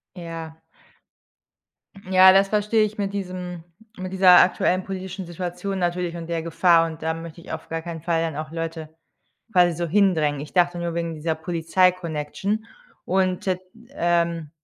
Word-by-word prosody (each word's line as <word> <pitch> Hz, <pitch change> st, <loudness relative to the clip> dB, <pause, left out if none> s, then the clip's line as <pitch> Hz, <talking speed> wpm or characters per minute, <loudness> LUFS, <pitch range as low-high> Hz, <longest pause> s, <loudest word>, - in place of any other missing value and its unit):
Ja. 165 Hz, -2 st, -8 dB, 1.5 s
Ja, 190 Hz, 0 st, +8 dB
das 195 Hz, +1 st, +4 dB
verstehe 210 Hz, +1 st, +2 dB
ich 215 Hz, 0 st, -3 dB
mit 200 Hz, -1 st, -2 dB
diesem 180 Hz, -3 st, -5 dB, 0.4 s
mit 185 Hz, 0 st, -5 dB
dieser 185 Hz, -1 st, +8 dB
aktuellen 185 Hz, 0 st, +2 dB
politischen 190 Hz, 0 st, -6 dB
Situation 180 Hz, +3 st, -4 dB
natürlich 175 Hz, -1 st, -1 dB
und 165 Hz, -1 st, -7 dB
der 165 Hz, -1 st, -2 dB
Gefahr 165 Hz, 0 st, +4 dB
und 160 Hz, -1 st, -7 dB
da 160 Hz, 0 st, -1 dB
möchte 165 Hz, 0 st, -9 dB
ich -, -, -10 dB
auf 160 Hz, 0 st, -6 dB
gar 165 Hz, 0 st, -4 dB
keinen 165 Hz, -1 st, -7 dB
Fall 165 Hz, -1 st, +1 dB
dann 165 Hz, -2 st, -2 dB
auch 155 Hz, +1 st, -5 dB
Leute 165 Hz, -1 st, -5 dB, 0.6 s
quasi 180 Hz, -2 st, +5 dB
so 170 Hz, +2 st, -2 dB
hindrängen. 160 Hz, -6 st, +2 dB
Ich 145 Hz, 0 st, -9 dB
dachte 175 Hz, -1 st, +2 dB
nur 170 Hz, -1 st, -3 dB
wegen 170 Hz, -1 st, -2 dB
dieser 160 Hz, +1 st, -2 dB
Polizei-Connection 175 Hz, +3 st, 0 dB, 0.4 s
und 185 Hz, -1 st, +1 dB
t 185 Hz, -2 st, +1 dB, 0.3 s
ähm, 170 Hz, -, 0 dB
175 Hz, 160 wpm, -23 LUFS, 165-185 Hz, 1.5 s, Ja